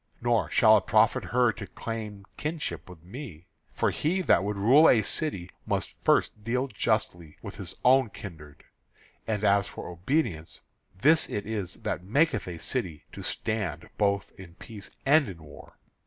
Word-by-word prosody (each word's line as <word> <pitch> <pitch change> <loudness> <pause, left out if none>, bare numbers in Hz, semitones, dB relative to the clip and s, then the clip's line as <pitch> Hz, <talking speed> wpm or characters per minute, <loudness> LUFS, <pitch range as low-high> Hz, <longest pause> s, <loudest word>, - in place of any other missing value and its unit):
Nor - - +1
shall - - +6
it - - -3
profit - - +3
her 120 -1 +3
to 100 0 -8
claim 105 0 -6
kinship 150 - -4
with 85 -3 -13
me, 95 - -9 0.3
for - - 0
he 180 +5 0
that 95 - +4
would 105 0 -2
rule 130 +11 +6
a 110 -3 +4
city 100 - -3 0.2
must - - -2
first 105 - +2
deal 125 +4 0
justly 90 - -2
with - - -8
his - - -6
own 130 -1 +5
kindred. 80 -9 -11 0.6
And 110 -2 -1
as 100 -1 +3
for - - -8
obedience, 90 - -2 0.4
this 155 +8 +4
it 105 - -3
is 105 -4 -4
that - - -3
maketh 140 - +1
a 90 -2 -5
city 90 - -3
to - - -9
stand 90 -8 -3
both 100 -1 +1
in 85 -3 -12
peace 105 0 -10 0.2
and 145 -3 +4
in 85 -4 -10
war." 75 - -14
105 Hz, 165 wpm, -27 LUFS, 90-125 Hz, 0.6 s, shall